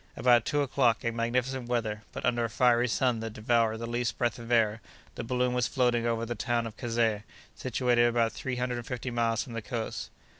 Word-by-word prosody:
About 120 -2 +4
two 145 0 +1
o'clock, 125 -4 +1
in 115 0 -1
magnificent 125 +2 -1
weather, 110 -3 -1
but - - -5
under 120 -1 +1
a - - -3
fiery 125 0 +3
sun 125 0 +1
that 110 -1 -5
devoured 110 0 +1
the 115 - -5
least 120 0 -2
breath 120 -1 0
of 115 0 -8
air, 110 -2 +3 0.3
the - - -5
balloon 125 +1 0
was 125 -3 +1
floating 120 -2 +1
over 115 0 0
the 120 - -3
town 120 +1 -1
of 115 -1 -7
Kazeh, 115 -3 0 0.3
situated 125 -1 +2
about 115 -1 +2
three 130 -1 -4
hundred 125 0 -2
and 120 - -9
fifty 125 0 -4
miles 115 -1 +1
from 125 - -10
the 115 - -3
coast. 115 0 -4
120 Hz, 215 wpm, -29 LUFS, 115-125 Hz, 0.3 s, About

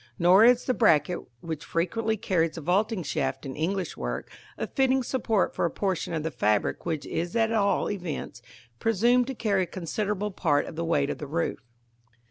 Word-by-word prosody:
Nor 180 +5 +6
is 245 0 +5
the 255 - +1
bracket 175 - +3 0.2
which 160 -3 -5
frequently 220 +6 -1
carries 165 -5 0
the 165 - -6
vaulting 190 +4 +1
shaft 140 -1 -2
in 130 - -5
English 180 +3 -2
work - - -4 0.3
a - - -2
fitting 265 -1 +1
support 230 -5 0
for - - -2
a 170 - +2
portion 190 -2 -2
of 160 -2 -2
the 160 - -2
fabric 105 +5 0
which 160 -3 -2
is 170 +4 -3
at 225 -1 +2
all 205 -3 +2
events 175 -10 -5 0.4
presumed 235 +3 +3
to 270 - -4
carry 205 -5 +1
a 180 - -1
considerable 205 +3 -3
part 150 -6 +1
of - - -8
the 165 - -2
weight 145 -4 +1
of - - -6
the 150 - -6
roof. 165 +2 -2
180 Hz, 190 wpm, -27 LUFS, 160-220 Hz, 0.4 s, Nor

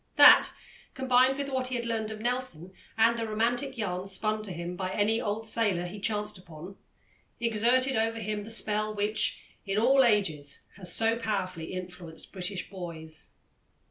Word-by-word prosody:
That, - - +9 0.5
combined 260 0 +3
with 280 -1 -3
what 260 -1 -1
he 255 -1 -2
learned 230 -2 -2
of 215 0 -7
Nelson, 240 -8 -2 0.2
and 225 +1 +5
the 225 - -2
romantic 240 +5 0
yarns 190 -2 -1
spun 215 +2 0
to 210 -3 -7
him 170 +1 -5
by 185 0 -3
any 215 +3 +1
old 215 +2 -2
sailor 210 -6 +1
he 195 +4 -7
chanced 210 -1 -1
upon, 175 +1 -11 0.6
exerted 240 +4 +2
over 225 +1 0
him 210 -1 -3
the 215 - -9
spell 215 -1 +1
which, 210 +1 0 0.2
in 195 0 -2
all 265 +5 +5
ages, 165 - +1 0.2
has 180 -3 -2
so 225 +3 +1
powerfully 185 -7 -3
influenced 180 -3 -7
British 185 0 -4
boys. 165 -4 -7
215 Hz, 160 wpm, -29 LUFS, 185-230 Hz, 0.6 s, That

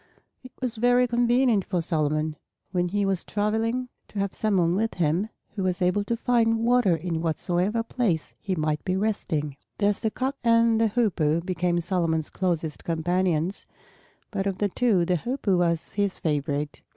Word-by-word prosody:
It 255 - -12
was 250 -3 -2
very 245 +2 +4
convenient 240 -2 +3
for 180 -1 -1
Solomon, 155 -2 0 0.4
when 180 -1 +1
he 200 +2 0
was 195 -2 0
traveling, 225 +4 -1 0.2
to - - -11
have 200 -1 -1
some 215 -3 0
one 170 -1 +3
with 225 +3 -1
him 175 +5 +1 0.2
who 200 - -5
was 185 -1 0
able 180 +3 +2
to 230 +2 -1
find 230 -1 +2
water 240 -7 +4
in 165 0 -3
whatsoever 180 +6 0
place 225 -9 -1
he 190 -2 -2
might 155 -2 -1
be 185 - 0
resting. 160 -9 -1 0.2
Thus 205 0 +1
the 220 - 0
Cock 265 +5 -3
and 230 -1 +4
the 225 - +4
Hoopoe 175 -9 +1
became 175 -1 0
Solomon's 165 -3 -1
closest 170 -4 -2
companions; 175 +2 0 0.6
but 200 -2 -1
of 195 -2 -2
the 205 - 0
two 200 -5 +2
the 180 0 +1
Hoopoe 235 - 0
was 170 -2 0
his 200 -2 0
favorite. 145 -1 -2
190 Hz, 170 wpm, -26 LUFS, 170-225 Hz, 0.6 s, very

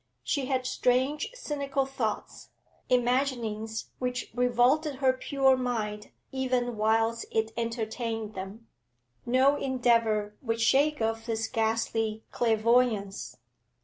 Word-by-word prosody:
She 280 -4 -1
had 260 -2 0
strange, 260 +3 +1
cynical 280 - -2
thoughts, 250 -5 -4 0.4
imaginings 240 -4 0
which 250 0 -3
revolted 250 +5 +2
her 260 -1 +3
pure 265 +1 +2
mind 220 -5 -3 0.2
even 255 -2 -1
whilst 225 +2 +1
it 220 0 0
entertained 230 -1 -3
them. 195 +4 -8 0.6
No 260 +4 +4
endeavour 230 -6 +1
would 230 -2 -2
shake 275 +3 +3
off 225 +1 -2
this 225 -1 -1
ghastly 225 -1 -1
clairvoyance. 220 - +1
240 Hz, 105 wpm, -28 LUFS, 220-260 Hz, 0.6 s, No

